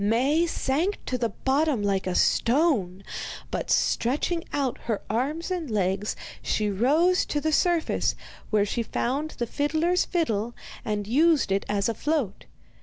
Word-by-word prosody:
Maie 270 +11 +2
sank 330 +6 0
to 255 - -2
the 235 -2 0
bottom 270 +1 0
like 195 -2 0
a 180 - -1
stone, 230 - +2 0.5
but, - - -3
stretching 295 +8 +1
out 270 -4 -1
her 225 -3 -1
arms 295 - -1
and 345 -6 -2
legs, 200 -1 0 0.3
she 210 -1 0
rose 305 - +3
to 295 - 0
the 315 +2 0
surface, 345 0 +2 0.3
where 210 -2 +3
she 220 +3 -2
found 270 +6 -1
the 240 - -1
fiddler's 315 +8 +1
fiddle, 240 - -1 0.3
and 210 -1 -2
used 290 +1 +3
it 195 +1 0
as 200 -1 +1
a 230 - 0
float. 275 -5 -2
260 Hz, 150 wpm, -26 LUFS, 210-315 Hz, 0.5 s, rose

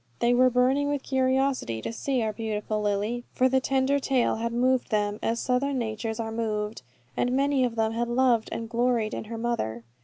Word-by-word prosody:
They 235 +1 +2
were 255 +1 +5
burning 260 +4 +2
with 285 -2 -2
curiosity 260 - 0
to - - -4
see 255 +1 -1
our 215 -1 -1
beautiful 215 -1 -3
Lily, 210 +4 -1
for 255 - +3
the 265 0 +3
tender 270 +1 +1
tale 265 -4 +1
had 230 +1 -2
moved 250 +2 +1
them, 210 -1 0
as 230 +1 0
Southern 265 +2 0
natures 220 -1 -3
are 225 -1 -3
moved; 215 - -2 0.3
and 245 - 0
many 275 0 +2
of 240 -2 -1
them 220 -1 +1
had 235 +1 -1
loved 240 -2 +2
and 230 - -4
gloried 235 -1 0
in - - -4
her 225 +1 -6
mother. 170 - -2
235 Hz, 195 wpm, -26 LUFS, 220-260 Hz, 0.3 s, were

